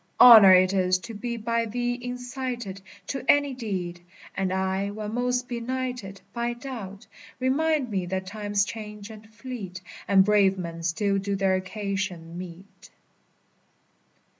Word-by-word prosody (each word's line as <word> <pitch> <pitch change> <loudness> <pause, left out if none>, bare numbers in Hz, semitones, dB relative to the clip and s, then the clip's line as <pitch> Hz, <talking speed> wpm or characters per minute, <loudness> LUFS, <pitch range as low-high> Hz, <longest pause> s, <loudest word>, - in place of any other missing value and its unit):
Honor 220 -6 +10
it 185 +1 +4
is 185 -1 +2
to 225 +5 -9
be 235 +3 -4
by 230 +1 0
thee 245 +2 -1
incited 245 -4 -5 0.2
To 270 +4 -4
any 285 -1 +4
deed; 185 -8 -4 0.3
and 190 -1 -1
I, 190 +1 -1
when 210 +1 -5
most 250 +1 0
benighted 245 -4 -4
By 235 0 -1
doubt, 240 -5 -8 0.3
remind 275 0 +1
me 190 -3 -1
that 190 +1 -3
times 205 0 -1
change 210 -1 -8
and 215 0 -13
fleet, 220 -5 -7 0.3
And 190 -1 +5
brave 200 -2 +4
men 170 -2 -6
still 195 +4 0
do 200 +1 -2
their 195 -1 +2
occasion 185 -3 -3
meet. 180 +2 -10
210 Hz, 140 wpm, -26 LUFS, 190-240 Hz, 0.3 s, Honor